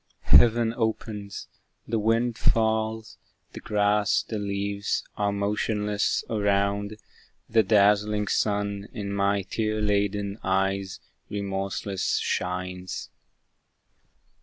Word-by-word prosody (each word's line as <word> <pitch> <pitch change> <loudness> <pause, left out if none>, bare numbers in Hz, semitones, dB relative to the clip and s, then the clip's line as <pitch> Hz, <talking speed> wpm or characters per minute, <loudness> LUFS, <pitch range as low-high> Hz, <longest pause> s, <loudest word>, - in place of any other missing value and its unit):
Heaven 115 -1 +6
opens; 110 -3 -3 0.4
the 115 0 0
wind 115 +2 +1
falls; 110 0 0 0.3
the - - -8
grass, 105 0 +2
the 110 - -4
leaves 100 0 -2
Are 100 -1 0
motionless, 105 +1 0
around; 100 0 0 0.5
the 115 0 +4
dazzling 105 0 +3
sun 100 -1 0
In 100 -4 -4
my 100 0 +1
tear 110 +2 -2
laden 100 0 0
eyes 95 0 0 0.3
remorseless 100 -1 -2
shines. 90 0 -3
105 Hz, 90 wpm, -26 LUFS, 100-110 Hz, 0.5 s, Heaven